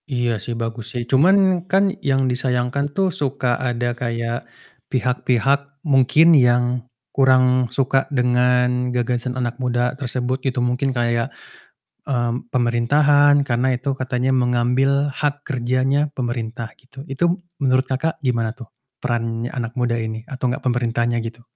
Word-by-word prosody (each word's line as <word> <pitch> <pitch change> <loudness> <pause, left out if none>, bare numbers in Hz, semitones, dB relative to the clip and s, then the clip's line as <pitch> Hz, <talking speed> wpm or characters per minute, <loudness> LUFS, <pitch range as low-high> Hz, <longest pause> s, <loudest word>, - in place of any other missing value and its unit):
Iya 120 -5 -1
sih 120 +1 -5
bagus 115 0 -4
sih, 120 - -2
cuman 185 +5 +4
kan 195 0 +3
yang 135 -1 +1
disayangkan 125 +2 0
tuh 190 +3 0
suka 130 -4 -1
ada 120 -1 -1
kayak 115 -1 -3 0.5
pihak-pihak 130 +3 0
mungkin 150 +4 +5
yang 125 -4 +5 0.5
kurang 130 -2 +3
suka 135 +1 +1
dengan 125 -1 +2
gagasan 125 +1 -1
anak 120 0 -3
muda 125 0 0
tersebut. 130 0 -2
Itu 130 0 -2
mungkin 125 +3 0
kayak, 120 -2 0 0.8
mmm, 120 -2 -1
pemerintahan 145 +4 +4
karena 130 0 0
itu 130 +3 -2
katanya 130 0 -1
mengambil 130 +3 +2
hak 145 +1 -2
kerjanya 130 +3 0
pemerintah 120 -2 -4
gitu. 135 +1 -12
Itu 170 +6 -1 0.2
menurut 130 -2 +2
Kakak, 160 +5 -2
gimana 115 -3 0
tuh 125 -2 -12 0.3
peran 115 -2 -2
anak 120 -2 -5
muda 120 -1 +1
ini 110 0 -4
atau 130 -1 -3
enggak 125 - -4
pemerintahannya 120 -1 0
gitu? 115 +1 -7
125 Hz, 135 wpm, -21 LUFS, 120-135 Hz, 0.8 s, mungkin